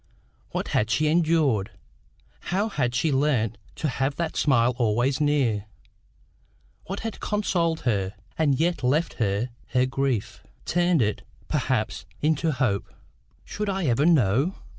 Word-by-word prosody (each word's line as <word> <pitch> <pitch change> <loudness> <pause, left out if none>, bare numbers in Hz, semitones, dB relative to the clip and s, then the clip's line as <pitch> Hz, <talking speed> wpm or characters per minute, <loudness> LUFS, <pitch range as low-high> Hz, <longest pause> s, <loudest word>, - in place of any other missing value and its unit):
What - - -3
had 110 - +1
she 155 - +2
endured? 155 - +2 0.8
How 200 +5 +1
had 125 - -1
she 150 +5 +1
learned 130 -6 +1 0.2
to 155 - -2
have 135 +1 -1
that 170 -2 -3
smile 125 -3 +3
always 120 +5 +1
near? 130 -9 +1 1.2
What 195 +2 -4
had 225 -1 -5
consoled 175 -6 0
her, 100 -5 -1 0.2
and 145 -5 +2
yet 175 +2 +1
left 145 +7 +1
her 105 +3 0 0.2
her 125 0 +2
grief 130 -4 -2 0.2
turned 175 -5 +2
it, 105 0 -1 0.3
perhaps, - - -1
into 155 +1 +1
hope? 125 -8 -1 0.5
Should 210 0 -3
I 195 -2 -1
ever 135 +4 +3
know? 140 - +3
140 Hz, 135 wpm, -25 LUFS, 120-165 Hz, 1.2 s, smile